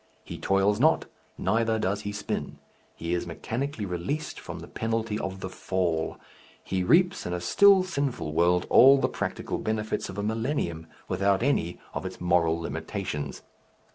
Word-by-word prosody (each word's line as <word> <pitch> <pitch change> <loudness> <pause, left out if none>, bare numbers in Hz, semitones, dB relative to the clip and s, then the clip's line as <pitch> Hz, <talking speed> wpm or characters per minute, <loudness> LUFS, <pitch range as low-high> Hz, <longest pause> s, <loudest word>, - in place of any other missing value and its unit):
He - - -8
toils 95 +2 +2
not, 155 +4 +4 0.3
neither 115 +3 +1
does 100 0 -1
he 105 - -4
spin; 105 0 -4 0.4
he 85 +1 -3
is 85 -1 -1
mechanically 115 - -3
released 90 - -3
from - - -7
the - - -9
penalty 115 -1 -2
of 95 0 -5
the - - -3 0.2
Fall, 85 -4 0 0.5
he 95 -1 -1
reaps 175 - +3
in 90 - -3
a 90 - -1
still 195 - +6
sinful 140 - -2
world 85 +2 +3
all 135 +2 +8
the - - +2
practical - - -3
benefits 110 0 -2
of 95 - -8
a 100 - -2
millennium 110 - -2 0.2
without 100 +1 +1
any 105 -11 0
of - - -4
its - - -6
moral 85 -2 +2
limitations. 75 -4 -4
100 Hz, 160 wpm, -27 LUFS, 90-115 Hz, 0.5 s, all